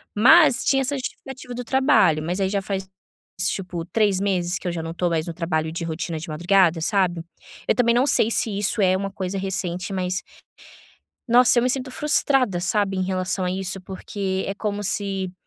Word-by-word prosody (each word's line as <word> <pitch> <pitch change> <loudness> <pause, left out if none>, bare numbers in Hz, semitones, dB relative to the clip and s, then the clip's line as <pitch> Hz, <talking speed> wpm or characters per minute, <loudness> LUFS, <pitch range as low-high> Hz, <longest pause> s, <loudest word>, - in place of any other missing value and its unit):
mas 260 +4 +6
tinha 270 -1 +3
essa 275 +2 -1
justificativa 255 -1 -7
do 245 - -5
trabalho, 215 - +3
mas 180 +4 -2
aí 190 - +1
já 200 0 -1
faz, 190 -1 -4 0.5
tipo, 180 -3 -3
3 205 -1 +1
meses 180 -3 0
que 180 - -6
eu - - 0
já 170 - -4
não 165 - -5
tô 175 0 0
mais 160 0 -1
no 170 - -4
trabalho 160 -2 -2
de 170 +1 -4
rotina 165 0 -4
de 165 - -8
madrugada, 175 +1 +2
sabe. 180 -2 0 0.4
Eu - - +3
também 235 -1 +3
não 250 +2 +3
sei 225 - +3
se 215 -3 -1
isso 205 +2 -1
é 185 -1 +3
uma 195 0 -4
coisa 190 0 -4
recente, 185 -1 -3
mas, 185 -1 -2 1.1
nossa, 245 +1 +5
eu - - +3
me 250 - +2
sinto 260 0 -3
frustrada, 270 -9 +1
sabe, 195 +1 0
em - - +1
relação 185 0 -2
a 180 - 0
isso. 190 +1 -4
Porque 190 +1 -4
é - - -2
como 205 0 -3
se 195 -2 -2
190 Hz, 200 wpm, -23 LUFS, 180-220 Hz, 1.1 s, mas